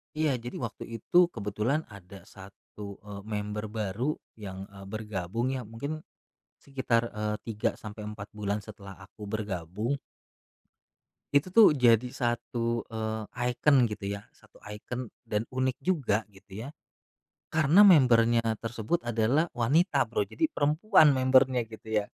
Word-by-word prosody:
Iya, 155 Hz, -1 st, +2 dB
jadi 120 Hz, +1 st, -7 dB
waktu 120 Hz, -3 st, -5 dB, 0.2 s
itu, 175 Hz, +6 st, +5 dB
kebetulan 115 Hz, -, -2 dB
ada 95 Hz, -2 st, -12 dB
1, 100 Hz, +1 st, -11 dB
eee, 100 Hz, -1 st, -8 dB
member 105 Hz, 0 st, -3 dB
baru 110 Hz, +6 st, -2 dB, 0.2 s
yang, 95 Hz, -2 st, -7 dB
eee, 100 Hz, -1 st, -11 dB
bergabung 110 Hz, +2 st, -3 dB
ya, 130 Hz, -4 st, -4 dB
mungkin 140 Hz, +8 st, -5 dB, 0.6 s
sekitar, 120 Hz, -4 st, -1 dB
eee, 105 Hz, 0 st, -2 dB
3, 110 Hz, -2 st, -1 dB
sampai 105 Hz, 0 st, -9 dB
4 105 Hz, -1 st, -9 dB
bulan 105 Hz, -1 st, -2 dB
setelah 100 Hz, -2 st, -11 dB
aku 100 Hz, +2 st, -11 dB
bergabung 105 Hz, -, -3 dB, 1.4 s
itu 145 Hz, +6 st, +3 dB
tuh 205 Hz, -7 st, +7 dB
jadi 120 Hz, -2 st, +4 dB
satu, 120 Hz, -1 st, -2 dB
eee, 110 Hz, -1 st, -3 dB, 0.3 s
ikon, 130 Hz, +1 st, +4 dB
gitu 105 Hz, -1 st, -5 dB
ya, 100 Hz, -, -10 dB
satu -, -, -23 dB
ikon, 115 Hz, +3 st, -6 dB, 0.2 s
dan 105 Hz, 0 st, 0 dB
unik 130 Hz, 0 st, 0 dB
juga 135 Hz, -, +1 dB
gitu 95 Hz, +2 st, -10 dB
ya. 135 Hz, -, -7 dB, 0.8 s
Karena 160 Hz, +6 st, +6 dB
member-nya 115 Hz, -, +5 dB
tersebut 115 Hz, +9 st, -3 dB
adalah 120 Hz, +8 st, +1 dB
wanita, 145 Hz, -, +2 dB
Bro. 425 Hz, -2 st, 0 dB
Jadi, 320 Hz, -5 st, -1 dB
perempuan 155 Hz, -, +4 dB
member-nya, 130 Hz, -1 st, +4 dB
gitu, 110 Hz, 0 st, -12 dB
ya. 105 Hz, -, -7 dB
115 Hz, 135 wpm, -29 LUFS, 105-130 Hz, 1.4 s, tuh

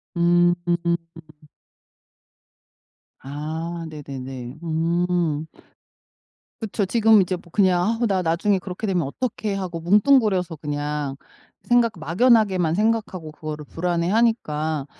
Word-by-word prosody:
음. 175 Hz, 0 st, +4 dB, 2.7 s
아 160 Hz, +4 st, -5 dB
네네네. 135 Hz, -3 st, -8 dB
음. 165 Hz, -1 st, 0 dB, 1.2 s
그쵸. 215 Hz, -1 st, -1 dB
지금 220 Hz, +1 st, +5 dB
이제 185 Hz, 0 st, -1 dB
뭐 175 Hz, -1 st, -14 dB
그냥 185 Hz, -3 st, +3 dB, 0.2 s
'아 -, -, +3 dB
나 195 Hz, -3 st, +1 dB
나중에 180 Hz, +4 st, +1 dB
그렇게 185 Hz, +3 st, -5 dB
되면 180 Hz, -4 st, +1 dB
어떡해.' 215 Hz, -, -3 dB
하고 180 Hz, -4 st, -4 dB
뭉뚱그려서 195 Hz, -1 st, +3 dB
그냥 145 Hz, -1 st, -3 dB, 0.5 s
생각 240 Hz, -2 st, +3 dB
막연하게만 185 Hz, -1 st, +3 dB
생각하고 210 Hz, -6 st, -1 dB
그거를 150 Hz, -1 st, -7 dB
불안해하니까 170 Hz, -, 0 dB
175 Hz, 230 characters per minute, -23 LUFS, 155-205 Hz, 2.7 s, 지금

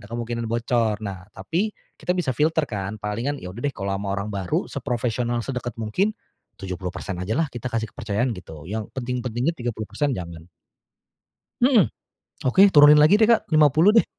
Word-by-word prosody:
ada 105 Hz, -, -13 dB
kemungkinan 115 Hz, 0 st, -4 dB
bocor. 115 Hz, -2 st, 0 dB
Nah, 95 Hz, -3 st, -6 dB
tapi 170 Hz, -, -2 dB, 0.2 s
kita 180 Hz, -, -1 dB
bisa 175 Hz, -7 st, 0 dB
filter 160 Hz, +1 st, +2 dB
kan, 100 Hz, -2 st, -4 dB
palingan 115 Hz, +8 st, -2 dB
ya 90 Hz, -, -6 dB
udah 110 Hz, -, -9 dB
deh 140 Hz, -, 0 dB
kalau 100 Hz, 0 st, -4 dB
ama 100 Hz, 0 st, -3 dB
orang 100 Hz, +2 st, -3 dB
baru 95 Hz, -3 st, -2 dB
seprofesional, 120 Hz, 0 st, -2 dB
sedeket 125 Hz, -3 st, -4 dB
mungkin, 185 Hz, -, 0 dB, 0.5 s
70% 90 Hz, 0 st, -5 dB
ajalah 115 Hz, -, -1 dB
kita 120 Hz, 0 st, -6 dB
kasih 115 Hz, -2 st, -2 dB
kepercayaan 115 Hz, +2 st, -1 dB
gitu, 80 Hz, -6 st, -10 dB
yang 110 Hz, 0 st, -3 dB
penting-pentingnya 125 Hz, +2 st, -2 dB
30% 120 Hz, +3 st, -2 dB
jangan. 85 Hz, -4 st, -7 dB, 1.1 s
Mhm. 245 Hz, -6 st, +4 dB, 0.5 s
Oke, 190 Hz, +10 st, +6 dB
turunin 150 Hz, -2 st, +8 dB
lagi 160 Hz, +7 st, +6 dB
deh, 220 Hz, -, +5 dB
Kak, 230 Hz, 0 st, +3 dB
50 155 Hz, +3 st, +5 dB
deh. -, -, +6 dB
120 Hz, 160 wpm, -23 LUFS, 105-145 Hz, 1.1 s, turunin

